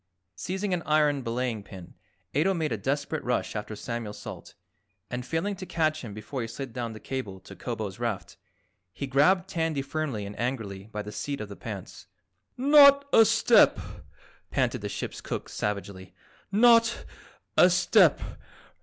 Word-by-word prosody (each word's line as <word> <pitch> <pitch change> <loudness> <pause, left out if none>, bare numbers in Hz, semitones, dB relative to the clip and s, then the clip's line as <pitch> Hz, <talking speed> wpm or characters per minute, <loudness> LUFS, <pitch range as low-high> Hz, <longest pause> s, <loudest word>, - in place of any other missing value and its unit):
Seizing 190 - -3
an 175 - 0
iron 150 -2 +3
belaying 120 -2 -2
pin, 95 -3 -12 0.4
Ato 180 +7 +2
made 160 -4 -1
a - - +1
desperate 140 +7 -2
rush 125 -2 -1
after 105 0 -4
Samuel 115 0 -5
Salt, - - -10 0.6
and 125 0 -3
failing 165 +9 -2
to 185 - -7
catch 155 -2 0
him 115 - -7
before 110 +5 -5
he 115 - -3
slid 125 +2 -7
down 120 -2 -4
the 110 - -9
cable 110 -9 -5
to - - -12
Kobo's 110 -4 -5
raft, 115 -5 -3 0.6
he 140 - -4
grabbed 165 +8 +3
Tandy 160 -6 -1
firmly 135 -7 -3
and 100 +1 -8
angrily 110 -6 -3
by 105 -1 -5
the 105 - -8
seat 140 +6 -4
of 105 - -6
the 100 - -8
pants. 100 -4 -8 0.5
"Not 280 +1 +7
a 225 - +8
step!" 225 +1 +5 0.7
panted - - 0
the - - -4
ship's - - -5
cook - - -5
savagely. 100 -2 -4 0.4
"Not 230 +2 +4 0.5
a - - +7
step! - - +4
130 Hz, 160 wpm, -27 LUFS, 105-165 Hz, 0.7 s, a